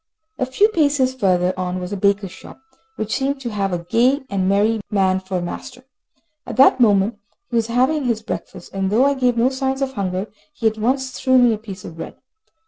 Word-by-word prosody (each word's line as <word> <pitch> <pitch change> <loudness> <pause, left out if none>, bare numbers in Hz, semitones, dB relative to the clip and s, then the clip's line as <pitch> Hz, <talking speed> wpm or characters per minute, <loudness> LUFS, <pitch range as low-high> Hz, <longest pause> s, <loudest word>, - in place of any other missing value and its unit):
A 255 - 0
few 330 +12 +3
paces 285 -8 +2
further 185 -6 +1
on 185 0 -3
was 180 +2 -5
a - - -1
baker's 200 -1 +1
shop, - - -13 0.4
which 215 0 -3
seemed 275 +1 -1
to 240 -3 -4
have 200 -2 -1
a 175 -1 -3
gay 250 - +2
and 190 -1 0
merry 210 +3 +2
man 190 -3 +2
for 185 0 -4
a - - -2
master. 255 +8 -7 0.6
At - - -7
that 265 0 +6
moment 205 -2 +3 0.3
he - - -2
was 225 -1 +1
having 260 +5 +1
his 225 -3 -1
breakfast, 185 -4 -7
and 195 -1 -1
though 230 +6 +3
I 280 - +3
gave 250 -3 +1
no 240 +3 +3
signs 265 0 -2
of 265 -1 -3
hunger, 190 -2 -2 0.3
he 250 - -7
at 220 0 +2
once 260 +4 0
threw 260 0 +2
me 245 -2 +5
a 215 - -4
piece 200 -4 -9
of 165 - -9
bread. - - -7
225 Hz, 220 wpm, -20 LUFS, 195-260 Hz, 0.6 s, that